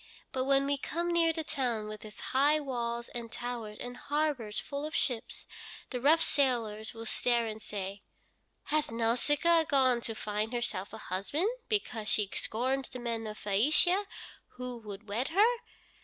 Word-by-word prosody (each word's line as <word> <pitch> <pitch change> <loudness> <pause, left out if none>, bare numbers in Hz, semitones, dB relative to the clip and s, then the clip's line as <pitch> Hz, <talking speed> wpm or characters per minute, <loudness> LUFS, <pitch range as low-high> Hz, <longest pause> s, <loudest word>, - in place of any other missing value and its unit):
But 260 -1 -1
when 275 0 +4
we 280 0 +1
come 340 +4 -2
near 335 -1 +4
the 320 0 -3
town 245 -8 -1
with 215 0 -7
its 210 -2 -9
high 290 +4 +5
walls 235 -4 -2
and 235 -1 -6
towers, 235 -3 -4
and 245 0 -6
harbors 285 -7 -1
full 280 0 -4
of 305 0 -4
ships, 240 -5 -2 0.5
the 250 -2 -2
rough 315 +5 +6
sailors 230 -6 +1
will 225 0 -6
stare 235 +1 +2
and 220 -1 -5
say, 200 -1 -5 0.6
'Hath 305 0 +1
Nausicaa 285 +9 +3
gone 260 -5 +3
to 225 -1 -4
find 215 +2 -2
herself 210 -5 -2
a 220 - -7
husband 220 - -1 0.2
because 240 - 0
she 210 -2 +3
scorns 260 +4 0
the - - -6
men 230 -2 -3
of 215 0 -6
Phæacia 305 - +3 0.5
who 250 -1 -5
would 210 -1 -9
wed 225 +7 0
her? 425 +8 +4
245 Hz, 165 wpm, -31 LUFS, 220-290 Hz, 0.6 s, rough